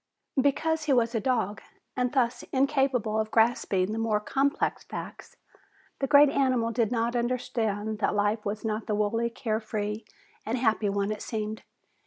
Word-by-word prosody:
Because 315 +3 +1
he 290 - +3
was 235 -1 +2
a 225 - +1
dog, 215 -4 -1 0.3
and 250 -1 0
thus 250 -3 +1
incapable 265 -5 +1
of 220 0 -1
grasping 215 -4 +2
the 220 - -2
more 220 -2 +1
complex 275 - 0
facts, - - -8 0.6
the 275 - 0
great 285 0 +7
animal 255 -4 +1
did 230 -1 0
not 235 0 0
understand 220 -3 -1
that 210 - +1
life 205 +1 +1
was 210 +2 -4
not 215 0 -2
the 210 - 0
wholly 225 +3 0
carefree 215 -2 -3 0.4
and 230 +3 -2
happy 220 -4 +1
one 200 +1 -1
it 210 - -4
seemed. 215 -1 -4
225 Hz, 160 wpm, -27 LUFS, 215-255 Hz, 0.6 s, great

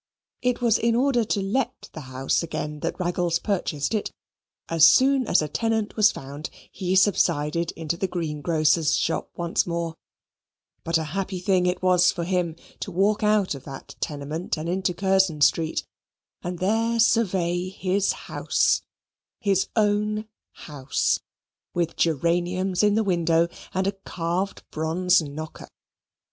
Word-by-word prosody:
It 250 0 0
was 230 -2 +3
in 230 0 +2
order 250 -1 +2
to 200 -2 -1
let 225 +7 -2
the - - -7
house 130 +1 0
again 150 -2 -4
that - - -3
Raggles 175 -1 0
purchased 175 -5 -2
it. 215 - -1 0.6
As 165 -1 +6
soon 265 +1 +4
as 175 - +3
a - - -2
tenant 220 +5 -1
was 215 -1 +5
found, 140 +3 -7 0.2
he 185 0 -2
subsided 170 -4 +2
into 165 0 -3
the 190 - -1
greengrocer's 155 -2 +1
shop 165 - -1
once 170 0 0
more; 170 -1 -2 0.9
but 165 0 +1
a 160 - -2
happy 195 -1 -2
thing 180 0 +2
it 180 0 -1
was 180 -1 +5
for 170 - -4
him 175 -2 -1 0.2
to - - -4
walk 200 +4 +2
out 210 -4 +2
of 140 - -9
that 135 -2 -9
tenement 150 +4 -3
and 155 +2 -4
into 180 0 -1
Curzon 190 -5 +2
Street, 160 +2 +2 0.6
and 180 0 -4
there 225 +5 +1
survey 185 -6 +2
his 190 +1 0
house - - 0 0.6
his 195 -2 +1
own 210 0 +1 0.4
house 140 -3 0 0.6
with 170 -1 -1
geraniums 175 +4 +1
in 210 -1 +3
the 220 - +2
window 170 -3 +2 0.2
and 190 0 -1
a 195 - +2
carved 185 -1 -3
bronze 170 +3 +2
knocker. 155 +1 -7
180 Hz, 145 wpm, -25 LUFS, 165-200 Hz, 0.9 s, As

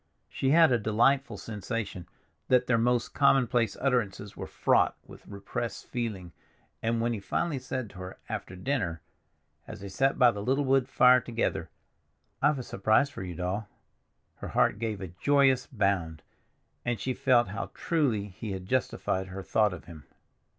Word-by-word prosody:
She 135 - -1
had 160 0 +6
a 120 - +3
delightful 115 +3 +2
sensation 105 -4 -5 0.4
that 125 -1 +4
their 115 -2 +2
most 120 0 +1
commonplace 125 -5 +3
utterances 105 -7 -1
were - - -6
fraught - - +2
with - - -14
repressed 100 +3 -5
feeling, 105 -8 -4 0.5
and 115 +1 0
when 120 +1 0
he 110 - -3
finally 145 +8 -2
said 130 -4 -5
to 95 - -12
her, 95 0 -8
after 95 - -5
dinner, 90 - -2 0.6
as 105 -3 -9
they 100 - -7
sat 135 +8 +1
by 125 -1 +6
the 100 - -6
little 135 +6 +1
wood 135 -1 +2
fire 125 -1 +6
together, 115 -1 -2 0.7
"I've 150 +1 +3
a 130 - -4
surprise 110 +7 +2
for - - -8
you, 90 -2 -6
Doll," 95 +5 -3 0.7
her - - -7
heart 105 - +2
gave 110 -3 -3
a 95 - -5
joyous 135 - +2
bound, 95 - -1 0.6
and 120 -2 -1
she 130 - -2
felt 120 -5 +3
how 110 +4 -4
truly 135 -12 0
he 100 +2 -6
had 95 -1 -6
justified 95 -4 -1
her 95 +1 -7
thought 105 +1 +2
of - - -9
him. 80 -5 -12
115 Hz, 165 wpm, -28 LUFS, 100-130 Hz, 0.7 s, had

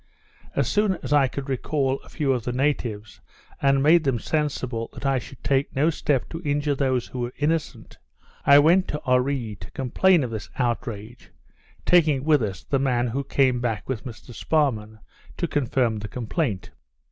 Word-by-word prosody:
As - - +1
soon 205 -2 +2
as - - -1
I 140 -2 +5
could 135 +2 -6
recal 135 0 -1
a - - -18
few 145 -4 0
of 125 -3 -2
the 125 - -2
natives, 120 -6 -2 0.4
and 140 0 +4
had 135 - +1
made 160 +2 +5
them 135 -4 +1
sensible 130 -5 -2
that - - -8
I 135 -1 +2
should 125 +2 -13
take 135 0 0
no 150 +5 +3
step 145 -4 0
to 165 - -6
injure 145 -2 0
those 130 -3 0
who 130 - -8
were 120 0 -3
innocent, 150 -6 -2 0.4
I 140 - +7
went 170 +6 +5
to 150 - -4
Oree 125 -4 0
to 80 - -10
complain 160 +6 +2
of 120 - -4
this 110 -2 -6
outrage, 120 -2 -3 0.6
taking 155 -6 +4
with 150 -2 +3
us 100 -4 -4
the 135 - 0
man 125 -3 +1
who 135 +4 -2
came 130 -2 +2
back 115 -3 -2
with 130 -4 -3
Mr 120 -1 -10
Sparrman, 110 -5 0 0.4
to 170 - -1
confirm 125 -6 0
the 105 - -6
complaint. 115 - -3
135 Hz, 180 wpm, -24 LUFS, 120-145 Hz, 0.6 s, I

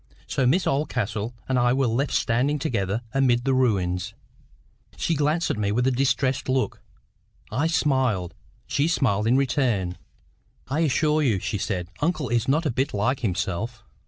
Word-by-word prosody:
So 130 -2 0
Miss 175 +8 +2
Oldcastle 120 -5 -1
and 130 -1 +1
I 120 0 +3
were 135 0 +2
left 125 +5 0
standing 130 +6 +1
together 115 -6 -1
amid 125 -2 +2
the 135 - +2
ruins. 95 -8 0 0.8
She 170 - 0
glanced 155 +3 +1
at - - -3
me 100 -1 0
with 120 +4 +1
a 130 - +3
distressed 130 0 0
look. 125 -4 0 0.7
I 135 +9 +1
smiled. 130 - +1 0.3
She 145 +2 +1
smiled 110 - +1
in 125 +3 +4
return. 120 - 0 0.7
"I 140 +5 -1
assure 155 0 +2
you," 120 -9 +2
she 100 +2 -3
said, 90 -4 -3
"uncle 155 -3 0
is 120 -1 +1
not 155 +5 +2
a 150 - +1
bit 130 0 -1
like 125 +6 +1
himself." 100 +3 -2
125 Hz, 160 wpm, -24 LUFS, 105-140 Hz, 0.8 s, in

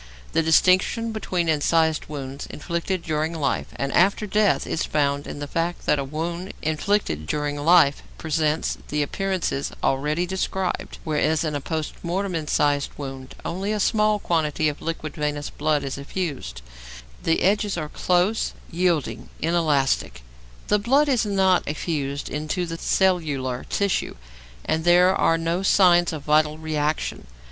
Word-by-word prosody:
The - - +3
distinction 185 +7 +3
between 185 -5 -2
incised 160 +1 +2
wounds 140 -2 -6
inflicted 170 +3 -3
during 155 +1 -1
life 140 -5 -1
and 140 0 -2
after 195 +4 +3
death 210 0 +2
is 160 - -2
found 145 -1 0
in - - -6
the 145 - -4
fact 165 +4 -2
that 150 - +2
a - - -1
wound 170 +6 -4
inflicted 155 - 0
during 145 - -1
life 150 -1 +4 0.2
presents 155 0 0
the 150 0 0
appearances 185 -3 -2
already 150 +6 +1
described, 190 0 -3
whereas 155 0 +1
in 155 -2 -2
a 145 - -2
post 155 +1 -3
mortem 185 +3 -2
incised 145 -3 +1
wound 135 -2 -7
only 190 +5 -2
a 215 - -1
small 215 +1 +2
quantity 155 -5 0
of 145 - -7
liquid 160 -2 -4
venous 150 -1 -3
blood 150 -1 0
is 135 0 -4
effused; 140 - -4 0.6
the 165 - +1
edges 205 0 +2
are 155 -2 -3
close, 180 +7 +1 0.2
yielding, 165 -10 0
inelastic; 145 - +1 0.4
the 210 - +3
blood 275 +7 +3
is 240 -5 +2
not 190 -2 +3
effused 145 -2 -3
into 155 +4 -2
the 165 0 -6
cellular 150 -10 0
tissue, 200 -2 0 0.5
and 160 0 0
there 180 +2 +5
are 165 - +3
no 165 +2 -1
signs 175 -3 +5
of 155 -3 -6
vital 150 +1 +2
reaction. 155 - -2
160 Hz, 145 wpm, -24 LUFS, 145-185 Hz, 0.6 s, there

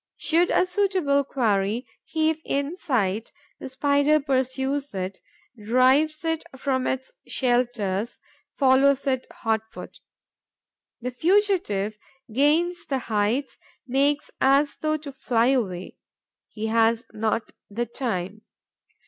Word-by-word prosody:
Should 340 +3 +2
a - - +3
suitable 360 -7 +1
quarry 225 -3 0 0.2
heave 315 0 0
in 280 +4 -2
sight, 225 - -1 0.3
the - - -7
Spider 285 +3 +3
pursues 270 -1 -1
it, 185 0 -4 0.4
drives 265 +8 +3
it 325 -1 0
from 260 -1 -1
its 265 0 -3
shelters, 240 -5 0 0.4
follows 275 0 +4
it 260 -2 0
hot 220 -2 -1
foot. - - -10 1.0
The 250 +1 -3
fugitive 315 - +1 0.3
gains 330 +6 +2
the 270 - 0 0.2
heights, 215 +7 0 0.3
makes 280 +3 +1
as 280 +2 +4
though 310 0 0
to 295 -2 -8
fly 245 -2 +1
away. 190 -9 -1 0.5
He 215 0 -6
has 225 +1 +2
not 220 +1 -1 0.2
the 235 +4 -2
time. 215 -5 -4
265 Hz, 115 wpm, -25 LUFS, 225-290 Hz, 1.0 s, follows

